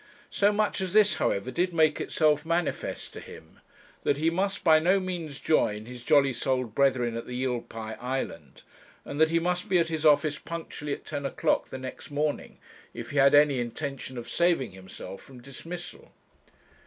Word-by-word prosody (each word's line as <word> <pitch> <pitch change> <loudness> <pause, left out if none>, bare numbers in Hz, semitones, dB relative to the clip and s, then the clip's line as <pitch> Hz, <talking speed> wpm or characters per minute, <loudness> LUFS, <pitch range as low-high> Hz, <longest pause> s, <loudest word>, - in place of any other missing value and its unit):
So 205 +1 +3
much 210 -1 0
as 185 -2 -3
this, 210 -1 +5
however, 100 +6 0
did 175 +5 -1
make 155 -2 +3
itself 155 -2 +2
manifest 170 0 -2
to - - -8
him, - - -13 0.4
that 140 - +1
he 160 +2 +2
must 195 +3 -1
by 160 -3 +6
no 185 +5 +3
means 175 -6 -5
join 105 -8 +1
his 125 0 -10
jolly 140 -2 +4
souled 125 -1 -1
brethren 125 -4 +2
at 115 - -5
the 125 - -6
Eel 125 -1 -1
pie 110 -1 -7
Island, 105 - -5 0.4
and 145 +2 -4
that 160 - +6
he 165 - +2
must 180 +4 -1
be 185 - +4
at 165 -1 +2
his 160 -1 -3
office 150 0 +4
punctually 160 -3 -5
at - - -8
ten 145 -2 -4
o'clock 140 - 0
the - - -6
next 130 +3 -8
morning 145 +1 -2 0.4
if 120 0 -7
he 145 - -4
had 140 +1 +6
any 145 -3 +5
intention 130 +1 -5
of 120 0 -6
saving 170 - +1
himself 95 +1 -10
from 130 -2 -14
dismissal. 165 +7 -9
145 Hz, 185 wpm, -27 LUFS, 125-170 Hz, 0.4 s, by